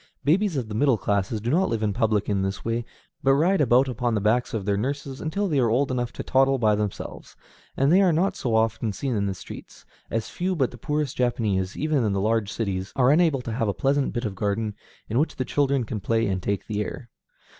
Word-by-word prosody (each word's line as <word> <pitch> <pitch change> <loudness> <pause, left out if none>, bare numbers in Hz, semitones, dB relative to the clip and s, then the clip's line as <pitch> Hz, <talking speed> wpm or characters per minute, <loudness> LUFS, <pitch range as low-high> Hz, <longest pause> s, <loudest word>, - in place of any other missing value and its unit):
Babies 175 +2 +2
of 125 -4 -2
the 105 - -6
middle 130 +2 +3
classes 100 +2 -1
do 115 +4 -2
not 180 +5 +2
live 110 -2 -1
in 105 -2 +1
public 105 -1 +1
in 100 -2 0
this 95 +1 -3
way, 115 +1 -1 0.4
but 135 -1 +4
ride 175 +5 +3
about 130 0 +4
upon 125 -2 -1
the - - +1
backs 110 +4 +1
of 105 -4 -3
their 100 0 +1
nurses 135 +4 -3
until 200 +6 -1
they 150 -6 +1
are 120 -3 +3
old 130 +4 +1
enough 120 -1 -1
to - - -5
toddle 135 0 +3
by 110 -4 +3
themselves, 105 -1 -4 0.4
and 135 +3 +3
they 190 - +6
are 185 -3 +4
not 175 +5 +1
so 120 -3 -1
often 110 -1 +1
seen 130 +5 -2
in 100 -1 0
the 95 - -2
streets; - - -11 0.2
as 115 -1 -2
few 185 +1 -2
but 135 -6 +1
the 120 - -11
poorest 150 +1 -2
Japanese, 105 -7 0
even 150 -3 +1
in 105 -3 +1
the 100 - 0
large 110 0 0
cities, 95 -4 -3
are 130 0 +4
unable 155 -4 +3
to 115 - -4
have 115 0 0
a 100 - -1
pleasant 140 0 +1
bit 120 0 -3
of 105 - -2
garden 105 +2 -1 0.3
in 115 +4 0
which 155 - 0
the 130 - -2
children 140 -2 +1
can 110 -1 -4
play 115 +3 +1
and 95 -2 -1
take 100 +1 -2
the 105 -1 -2
air. 120 +3 -6
120 Hz, 240 wpm, -25 LUFS, 105-140 Hz, 0.4 s, they